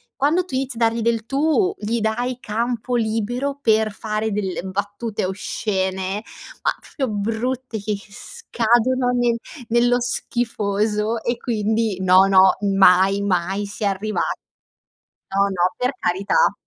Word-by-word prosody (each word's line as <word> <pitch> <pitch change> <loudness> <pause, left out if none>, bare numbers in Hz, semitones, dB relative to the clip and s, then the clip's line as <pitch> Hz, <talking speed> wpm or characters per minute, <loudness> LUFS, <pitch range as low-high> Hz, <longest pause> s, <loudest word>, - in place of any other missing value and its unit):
quando 325 +6 +2
tu 265 - -6
inizi 260 -2 -2
a - - -6
dargli 230 0 +2
del 230 0 0
tu, 320 - +1
gli 225 +3 -2
dai 240 +3 -1
campo 240 +2 -2
libero 240 +5 -1
per 220 -2 +3
fare 215 +1 -3
delle 195 -4 -2
battute 205 +3 -3
oscene, 190 0 -2 0.4
ma - - +3
f - - -18
proprio 265 -5 -1
brutte, 230 +4 -2
che 210 +1 -2
che 200 - -12
scadono 240 +5 0
nel 240 -1 +1 0.3
nello 245 +1 +3
schifoso, 215 -2 -1
e 240 0 -1
quindi 220 -3 -1
no, 185 +1 +6
no 190 -1 +5 0.2
mai 195 0 +3
si 205 +1 -7
è - - +2
arriva 205 +2 -1 1.2
no, 200 - +4
no, 185 +1 0
per 250 +2 0
carità. 200 - +2
220 Hz, 135 wpm, -21 LUFS, 200-245 Hz, 1.2 s, no